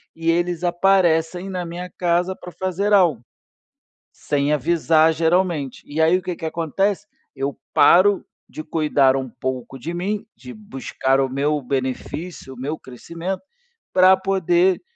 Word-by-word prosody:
e 165 0 +1
eles 175 0 -1
aparecem 175 -1 +2
na 180 -2 -3
minha 175 +1 -7
casa 175 +1 0
pra 180 - -11
fazer 190 +3 -2
algo, 170 - +4 0.9
sem 145 0 -1
avisar 160 +2 +3
geralmente. 165 -4 0
E 145 - -7
aí 165 +3 +4
o - - -9
que 180 -1 -4
que - - -9
acontece? 190 +6 -1 0.3
Eu 135 +1 -3
paro 195 +3 +5 0.2
de 155 - -8
cuidar 150 -4 +2
um 130 -1 -3
pouco 130 +1 -5
de 165 +7 -5
mim, 200 +4 -3
de 255 - -10
buscar 135 - -2
o 135 - +1
meu 145 +2 0
benefício, 135 +4 -4
o - - -16
meu 150 +4 -3
crescimento, 170 +9 -6 0.5
pra 185 +1 +6
poder 185 -1 +2
170 Hz, 145 wpm, -21 LUFS, 145-185 Hz, 0.9 s, pra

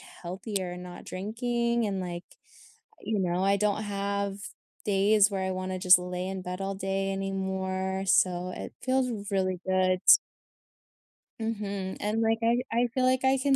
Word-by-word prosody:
healthier 185 0 -5
not 180 0 -9
drinking, 235 +4 -1
and, 195 -2 -2
like, 175 -1 -5 0.8
you 215 -1 -1
know, 180 0 0
I 200 +1 +3
don't 210 +1 +1
have 200 -1 -2 0.5
days 205 +1 +4
where 195 -1 -2
I 190 - -1
wanna 185 0 -3
just 180 0 +7
lay 180 0 -4
in 190 0 -4
bed 180 +1 -5
all 195 0 -2
day 195 0 -1
anymore, 190 0 -2
so 180 -1 +3
it - - -7
feels 260 0 +1 0.2
really 185 -2 0
good. 185 -1 +2 1.4
Mhm, 200 -4 -3
and, 210 +2 0
like, 225 0 +2
I- 235 +2 +3
I 240 +2 +2
feel 260 -1 +2
like 255 0 +2
I 265 0 +4
can 275 +1 +2
195 Hz, 155 wpm, -28 LUFS, 185-220 Hz, 1.4 s, just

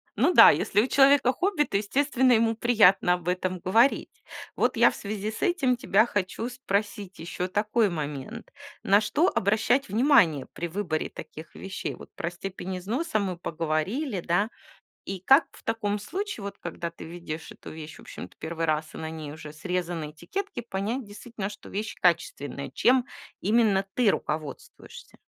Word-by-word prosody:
Ну 270 - +3
да, - - +10
если 205 - +2
у 255 - -1
человека 270 -2 +5
хобби, 360 +1 +1
то, 195 - -1
естественно, 255 +5 +2
ему 225 0 +3
приятно 210 -6 +4
об 175 -1 -5
этом 180 0 -1
говорить. 225 +10 +2 0.3
Вот - - +1
я - - +6
в - - -10
связи 210 +1 -4
с - - -8
этим 315 -10 +2
тебя 230 -4 +3
хочу 205 +2 -2
спросить 205 -5 -3
ещё 170 +2 -4
такой 210 +3 +1
момент. 150 - -6 0.3
На 200 +2 +5
что 255 +12 +2
обращать 220 - +1
внимание 215 - +4
при 175 - -4
выборе 165 -3 -2
таких 155 +2 -11
вещей? 190 -1 -5
Вот - - -13
про 170 - -3
степень 185 +1 -6
износа 225 - -2
мы 185 -4 -2
поговорили, 175 - -2
да? 175 +6 +1 0.6
И 190 -2 -5
как 270 - +5
в - - -17
таком 210 -2 -1
случае, 385 - -5
вот 200 - -6
когда 170 0 -5
ты 170 - -11
видишь 165 -1 -7
эту - - -11
вещь, 155 -1 -9
в - - -13
общем-то, - - -10
1-й 165 +1 -3
раз, 155 0 0
а - - -9
на 160 - -4
ней 155 -2 -7
уже 155 -1 -10
срезаны 175 -2 -3
этикетки, 390 - -5
понять 225 +2 -3
действительно, 205 -1 -6
что 205 - -11
вещь 215 +2 -4
качественная? 145 -6 0
Чем 250 - +3 0.3
именно 205 -2 +2
ты 245 -5 +4
руководствуешься? 155 - -6
200 Hz, 165 wpm, -26 LUFS, 170-235 Hz, 0.6 s, да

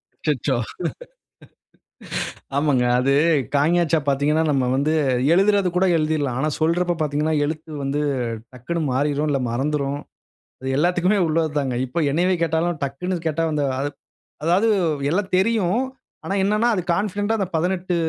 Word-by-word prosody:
அச்சச்சோ! 140 -3 -1 2.0
ஆமாங்க. 140 -4 +2
அது 135 +2 +2 0.4
க, - - +4
ங, 175 0 +3
ச - - +5
பார்த்தீங்கன்னா, 145 +3 +2
நம்ம 135 -3 +1
வந்து 150 +3 +1 0.4
எழுதறது 195 +1 +3
கூட 190 +1 +3
எழுதீறலாம். 150 -5 0
ஆனா 155 - +1
சொல்றப்ப 175 +2 +1
பார்த்தீங்கன்னா, 150 +1 0
எழுத்து 155 +1 -4
வந்து 140 +2 -1 0.5
டக்குன்னு 155 +7 -4
மாறிரும். 145 +3 0
இல்ல 135 -2 +1
மறந்துரும். 140 +2 -1 0.6
அது 130 - -3
எல்லாத்துக்குமே 180 +5 +2
உள்ளது 160 0 +1
தாங்க. 130 -3 -2
இப்போ 165 +7 -3
என்னையவே 180 +4 +2
கேட்டாலும், 165 0 0
டக்குன்னு 175 +7 -2
கேட்டா, 165 +1 0
அந்த 150 -1 0 0.8
அதாவது 185 +7 +3 0.4
எல்லா 195 +6 +1
தெரியும். 215 +1 +2 0.4
ஆனா 195 - -2
என்னன்னா, 210 +4 +2
அது 180 - 0
கான்ஃபிடன்ட்டா 205 +3 -1
அந்த 190 - 0
18 180 +1 0
160 Hz, 135 wpm, -22 LUFS, 145-180 Hz, 2.0 s, ச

